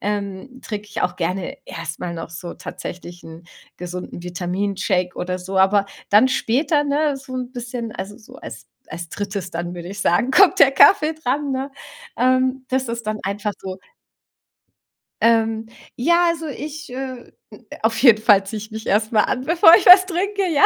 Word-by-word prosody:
ähm, 205 +5 -5
trink 210 -1 -5
ich 210 - -4
auch 180 0 -1
gerne 180 +1 -3
erst 165 0 -6
mal 170 -1 -5
noch 165 0 -7
so 170 +1 -8
tatsächlich 175 0 -9
'n 165 +1 -11 0.3
gesunden 180 -1 -7
Vitamin-Shake 185 +1 -2
oder 180 0 -3
so. 190 +1 -3
Aber 195 +1 +4 0.3
dann 215 +6 +6
später, 290 +5 +1
ne, 290 0 0
so 265 -1 -10
'n 250 -1 -4
bisschen 240 -2 -6
also 195 +2 -7
so 220 - -15
als - - -10 0.2
als 170 0 -7
drittes 200 -2 -5
dann, 175 +1 -5
würd 175 -1 -8
ich 195 +3 -7
sagen, 205 +8 +2
kommt 380 +6 +5
der 270 - +8
Kaffee 310 +3 +5
dran, 290 -1 -2
ne? 265 +2 -3 0.5
Ähm, 255 +1 +1
das 260 -1 -1
ist 235 0 -4
dann 215 0 -2
einfach 205 +2 -3
so. 190 -1 -7 1.4
Ähm, 225 -1 +2 0.3
ja, 340 +7 +3
also 330 -1 -2
ich, 300 0 -7
äh 260 -1 -7 0.5
auf 225 0 +1
jeden 230 -5 +7
Fall 205 -3 +5
zieh 220 - -5
ich 215 +1 -9
mich 220 0 -8
erst 215 +3 +1
mal 215 -2 +3
an, 255 - -2
bevor 335 0 +7
ich 395 - +3
was 370 +1 +10
trinke, 390 +2 -2
ja. 290 - +4
220 Hz, 175 wpm, -21 LUFS, 190-270 Hz, 1.4 s, was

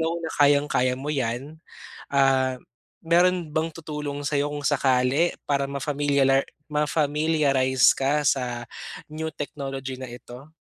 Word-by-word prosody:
know 165 +1 0
na 160 -1 -4
kayang-kaya 140 -3 +3
mo 145 +3 -4
'yan. 135 +4 -3 0.5
Ah, 135 -2 +3 0.5
meron 175 0 +3
bang 160 +1 0
tutulong 150 -3 -5
sayo 145 0 0
kung 145 - -4
sakali 135 +3 +2 0.2
para 140 -1 +1
mafamilialar 140 -1 +1 0.2
ma-familiarize 150 -3 +2
ka 140 +3 +1
sa 120 -2 -1 0.4
new 160 +1 -5
technology 135 -2 -5
na 130 - -7
ito? 125 +4 -12
140 Hz, 120 wpm, -25 LUFS, 135-150 Hz, 0.5 s, kayang-kaya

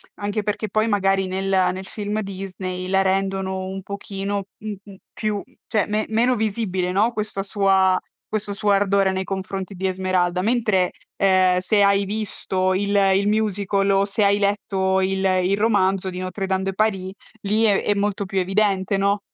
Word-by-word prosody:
Anche 205 +1 -3
perché, 210 +1 -2
poi, 215 +3 +1
magari 195 -2 +1
nel 190 +1 -2 0.2
nel 190 +1 -7
film 210 +1 -3
Disney 185 -2 -5
la 190 +1 +2
rendono 190 0 -1
un 190 +1 -5
pochino, 200 0 -4
m 215 0 -5
mhmm, 200 -1 -12 0.2
più 215 -1 -2
mhmm, - - -28
cioè 210 -3 +1
me 215 +1 0
meno 240 +3 +2
visibile, 200 -4 -1
no, 210 +5 +2
questa 210 -3 -2
sua 195 -2 +3 0.3
questo 210 -1 -3
suo 205 +1 -1
ardore 200 -1 +3
nei 190 0 -2
confronti 190 0 -5
di 190 +1 -2
Esmeralda, 185 -1 0
mentre, 215 -5 +2 0.3
uhm, 185 -2 +4
se 205 +3 +2
hai 200 0 +3
visto 190 -2 -1
il 200 +1 0 0.2
il 200 +1 +1
musical 200 -2 +1
o 195 0 +3
se 200 +1 0
hai 200 0 +4
letto 195 -2 +1
il 190 0 0 0.2
il 190 +2 +1
romanzo 195 -3 +2
di 180 - -6
Notre-Dame 190 +1 -2
de 195 - -2
Paris 195 -3 0 0.3
lì 210 +3 +1
è 205 -3 +3
è 205 - +2
molto 200 0 -1
più 195 0 -4
evidente, 195 0 +1
no? 200 +1 +1
195 Hz, 175 wpm, -22 LUFS, 190-205 Hz, 0.3 s, uhm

